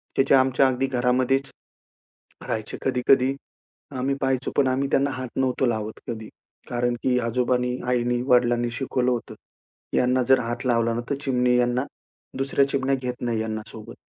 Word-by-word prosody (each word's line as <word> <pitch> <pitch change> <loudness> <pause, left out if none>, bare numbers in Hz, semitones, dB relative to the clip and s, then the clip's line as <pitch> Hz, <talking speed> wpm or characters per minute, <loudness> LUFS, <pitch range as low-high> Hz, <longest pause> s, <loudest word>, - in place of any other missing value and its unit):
त्याचे 135 +1 +4
आमच्या 130 0 +4
अगदी 130 +1 0
घरामध्येच 130 +1 +1 1.0
राहायचे, 110 -1 -3
कधी-कधी 130 +1 +3 0.6
आम्ही 135 +2 0
पाहायचो, 135 -1 0
पण 140 - +3
आम्ही 135 +2 0
त्यांना 140 +1 +2
हात 130 -1 -5
नव्हतो 130 0 +1
लावत 110 -2 -2
कधी. 110 -2 -6 0.4
कारण 120 0 0
की 125 -1 +2
आजोबांनी, 125 +1 0
आईनी, 120 -1 +1
वडिलांनी 120 -2 +3
शिकवलं 125 0 -1
होतं. 120 -2 -4 0.6
यांना 125 +1 +2
जर 130 +2 +4
हात 120 +2 -4
लावला 115 -2 +2
ना, 120 - -2
तर 140 - 0
चिमणी 125 -3 +2
यांना, 125 +1 +1 0.5
दुसऱ्या 135 +1 +2
चिमण्या 135 0 +1
घेत 125 -2 -3
नाही 115 -2 -1
यांना 110 0 -3
सोबत. 110 -1 -10
125 Hz, 155 wpm, -24 LUFS, 120-130 Hz, 1.0 s, त्याचे